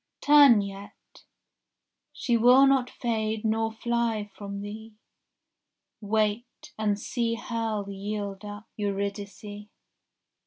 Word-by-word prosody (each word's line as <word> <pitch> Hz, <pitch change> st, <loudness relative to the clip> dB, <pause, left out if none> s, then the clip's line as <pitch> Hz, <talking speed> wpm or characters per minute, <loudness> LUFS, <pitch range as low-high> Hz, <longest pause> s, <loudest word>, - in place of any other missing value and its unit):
Turn 285 Hz, -7 st, +7 dB
yet, 200 Hz, 0 st, -11 dB, 0.9 s
she 240 Hz, -, -1 dB
will 250 Hz, +4 st, +6 dB
not 270 Hz, -2 st, +3 dB
fade 220 Hz, -2 st, -2 dB
nor 225 Hz, +1 st, +1 dB
fly 225 Hz, -2 st, -1 dB
from 200 Hz, -1 st, -6 dB
thee; 215 Hz, +2 st, -8 dB, 1.1 s
Wait, 220 Hz, +7 st, -2 dB
and 210 Hz, -2 st, 0 dB
see 230 Hz, 0 st, -1 dB
hell 225 Hz, -3 st, -3 dB
yield 200 Hz, 0 st, -5 dB
up 205 Hz, +1 st, -8 dB
Eurydice. 200 Hz, 0 st, -4 dB
215 Hz, 95 wpm, -27 LUFS, 205-235 Hz, 1.1 s, Turn